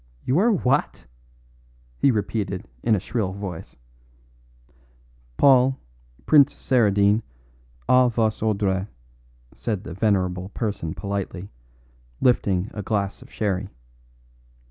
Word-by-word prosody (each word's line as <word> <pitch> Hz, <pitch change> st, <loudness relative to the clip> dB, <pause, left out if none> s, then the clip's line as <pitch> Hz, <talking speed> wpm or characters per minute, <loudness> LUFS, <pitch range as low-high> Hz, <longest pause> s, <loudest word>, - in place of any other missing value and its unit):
"You 135 Hz, +7 st, +2 dB
are 230 Hz, +4 st, +4 dB
what?" 135 Hz, -, 0 dB, 0.9 s
he -, -, +4 dB
repeated 100 Hz, -4 st, -2 dB
in 110 Hz, -, +3 dB
a -, -, 0 dB
shrill 95 Hz, -1 st, -2 dB
voice. 95 Hz, -4 st, -7 dB, 1.6 s
"Paul, 130 Hz, -1 st, +5 dB, 0.5 s
Prince 145 Hz, -2 st, +5 dB
Saradine, 105 Hz, -4 st, +2 dB, 0.7 s
A 125 Hz, -1 st, +5 dB
vos 110 Hz, -2 st, 0 dB
ordres," 100 Hz, -3 st, 0 dB, 0.7 s
said 105 Hz, -4 st, -3 dB
the 90 Hz, -, -7 dB
venerable 95 Hz, -2 st, 0 dB
person 100 Hz, -8 st, -3 dB
politely, 100 Hz, -2 st, -5 dB, 0.7 s
lifting 100 Hz, -6 st, +1 dB
a 105 Hz, -, -5 dB
glass 100 Hz, -1 st, -2 dB
of -, -, -15 dB
sherry. 100 Hz, -2 st, -2 dB
105 Hz, 100 wpm, -23 LUFS, 95-120 Hz, 1.6 s, Paul